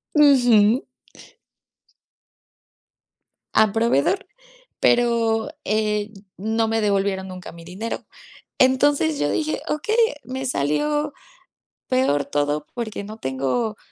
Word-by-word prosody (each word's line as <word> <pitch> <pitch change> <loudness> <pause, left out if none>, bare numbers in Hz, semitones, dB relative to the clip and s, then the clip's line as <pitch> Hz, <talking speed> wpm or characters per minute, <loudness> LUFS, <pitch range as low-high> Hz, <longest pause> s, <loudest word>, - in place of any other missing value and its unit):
Ujú. 245 -6 +5 2.7
Al 220 -1 +5
proveedor, 230 - +1 0.5
pero, 235 0 +2 0.2
eh, 210 0 0 0.3
no 220 +3 0
me 225 0 0
devolvieron 195 -2 0
nunca 185 -1 -9
mi 170 0 -13
dinero. 190 +7 -5 0.5
Entonces, 260 - +3
yo 145 0 +1
dije: 310 0 -1
"Okey, 430 +9 -1 0.3
me 260 +3 -5
salió 290 - 0 0.8
peor 255 - +1
todo 145 +1 -1
porque 220 -4 -4
no 215 +2 -9
tengo 135 - -2
220 Hz, 95 wpm, -22 LUFS, 185-255 Hz, 2.7 s, Ujú